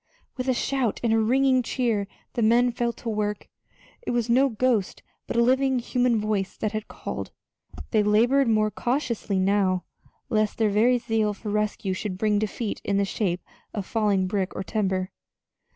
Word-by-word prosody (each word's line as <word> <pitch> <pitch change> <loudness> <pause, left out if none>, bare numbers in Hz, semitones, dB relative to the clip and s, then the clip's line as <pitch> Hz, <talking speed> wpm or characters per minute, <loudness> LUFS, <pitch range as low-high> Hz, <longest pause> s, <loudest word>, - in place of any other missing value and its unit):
With 255 0 -4
a 260 - +3
shout 255 -4 0
and 230 -2 +2
a 225 - +4
ringing 260 +3 +3
cheer 230 -5 -1 0.3
the 235 - -1
men 240 +3 +4
fell 235 0 -1
to 235 - -11
work 210 -1 -2 0.5
it - - -6
was 240 -1 0
no 270 +3 +4
ghost, 230 -4 0 0.2
but - - -3
a 235 - +5
living 260 +1 +3
human 245 -1 +1
voice 210 -2 -2
that 215 - -1
had 215 0 -4
called! - - -6 0.6
They 215 - +4
labored 235 +6 +3
more 215 -1 +2
cautiously 240 -6 -1
now, 190 -1 +2 0.4
lest 215 -1 0
their 220 -2 +2
very 235 +5 +4
zeal 225 -3 0
for 210 +1 -6
rescue 210 -2 -1
should 185 0 -4
bring 210 0 +2
defeat 215 +1 -3
in 200 - 0
the 200 - +2
shape 185 -3 -1 0.3
of 200 -3 -3
falling 205 -4 +1
brick 190 0 -2
or - - -3
timber. 190 -3 -1
215 Hz, 175 wpm, -25 LUFS, 205-240 Hz, 0.6 s, a